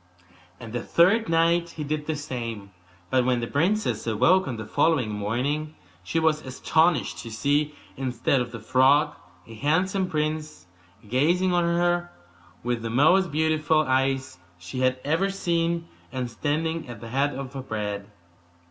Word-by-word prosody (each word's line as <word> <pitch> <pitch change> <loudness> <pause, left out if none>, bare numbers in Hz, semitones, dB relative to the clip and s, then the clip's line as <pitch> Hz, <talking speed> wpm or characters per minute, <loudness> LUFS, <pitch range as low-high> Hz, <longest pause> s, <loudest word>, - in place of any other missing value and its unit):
And 115 -1 -9
the 120 - -2
third 195 - +3
night 170 +1 +3
he 155 - -3
did 150 +1 -3
the 155 - -1
same. 115 -8 -5 0.4
But 130 -1 +3
when 125 -1 +1
the 120 - -2
princess 180 - 0
awoke 170 - +3
on 125 -4 -3
the 110 - -6
following 125 0 +1
morning 130 +9 -2 0.3
she 125 - -3
was 160 -1 +2
astonished 155 +3 +1
to 115 - -7
see, 145 +6 0 0.2
instead 130 0 0
of 120 -1 -4
the 115 - -7
frog, 135 +6 +3 0.3
a 115 - -12
handsome 180 - 0
prince, 155 - -3 0.4
gazing 170 - +2
on 175 -1 +2
her 175 0 +1 0.5
with 120 -1 -1
the 115 - -4
most 165 +10 +4
beautiful 155 0 +2
eyes 130 -5 0 0.2
she 90 +8 -7
had 130 0 +1
ever 165 +7 +1
seen, 170 -3 -1 0.2
and 125 -2 -3
standing 160 +5 -2
at 120 -3 -8
the 115 - -9
head 140 +3 0
of 135 -1 -6
her 135 - -5
bed. 105 -4 -4
145 Hz, 155 wpm, -25 LUFS, 120-165 Hz, 0.5 s, most